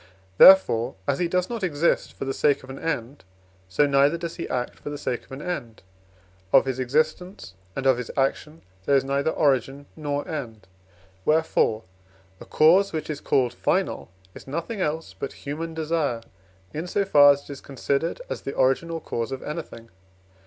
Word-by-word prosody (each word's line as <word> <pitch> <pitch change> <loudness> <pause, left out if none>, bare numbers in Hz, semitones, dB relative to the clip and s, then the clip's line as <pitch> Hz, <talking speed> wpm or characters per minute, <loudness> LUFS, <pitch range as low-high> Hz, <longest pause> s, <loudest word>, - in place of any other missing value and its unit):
Therefore, 185 -12 +7
as 140 - 0
he 175 - +1
does 180 +1 0
not 235 -2 -5
exist 165 -2 0
for - - -6
the 135 - -2
sake 140 -1 +1
of 130 - -10
an 135 - -8
end, 140 -4 -4 0.5
so 120 +10 +3
neither 140 +3 +3
does 170 0 -6
he - - -5
act 125 -1 -3
for - - -7
the 145 - -5
sake 125 -4 -3
of - - -24
an 135 +2 -7
end; 125 - -5 0.7
of 135 - +6
his 130 -1 -3
existence 155 - -1 0.2
and 135 - -4
of 130 -2 +4
his 125 - -6
action 150 +4 -1 0.2
there 140 - +4
is 135 - +3
neither 140 +2 0
origin 140 -2 0
nor 145 -2 -3
end. 115 -9 -6 0.6
Wherefore, 150 -7 +2 0.6
a - - -11
cause 180 +6 +4
which 155 0 -3
is 150 - -6
called 125 -3 +1
final 120 - -1 0.2
is - - -13
nothing 170 +9 -4
else 150 - -2
but 95 - -6
human 160 +3 -4
desire, 155 -7 -1 0.5
in 160 +4 -4
so 200 +2 0
far 145 -6 +7
as 140 0 -8
it - - -11
is 140 - -8
considered 140 - -2
as - - -5
the 135 - -5
origin 135 +6 +2
or 165 -1 -4
cause 115 -5 -4
of 135 - -5
anything. 150 -7 -7
145 Hz, 185 wpm, -24 LUFS, 135-165 Hz, 0.7 s, Therefore